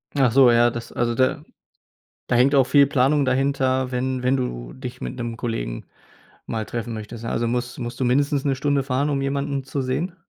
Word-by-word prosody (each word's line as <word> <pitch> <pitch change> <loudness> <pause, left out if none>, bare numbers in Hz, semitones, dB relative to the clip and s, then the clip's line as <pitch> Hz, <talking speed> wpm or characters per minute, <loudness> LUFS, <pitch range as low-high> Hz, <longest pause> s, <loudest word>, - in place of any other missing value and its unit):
Ach 135 -5 +3
so, 130 -1 +6
ja, 120 0 +5
das 115 0 -7
also, 120 -1 0
da 130 +1 +1 0.8
da 125 - +1
hängt 130 +4 +4
auch 135 - +6
viel 140 +2 +5
Planung 140 +2 +2
dahinter, 130 -1 +1
wenn 130 0 -2
wenn 130 +1 +3
du - - -4
dich - - -8
mit 60 - -5
'nem 115 -1 -5
Kollegen 115 - -4 0.6
mal 110 -1 -3
treffen 120 0 -5
möchtest? 110 +2 -7
Also, 115 0 -1
muss 120 +1 -2
musst 120 0 -6
du 130 - +1
mindestens 140 +2 +1
'ne 135 -2 +1
Stunde 140 0 0
fahren, 135 +2 0
um 140 -2 0
jemanden 140 0 -2
zu 135 0 -3
sehen? 160 +8 -2
130 Hz, 200 wpm, -23 LUFS, 120-135 Hz, 0.8 s, so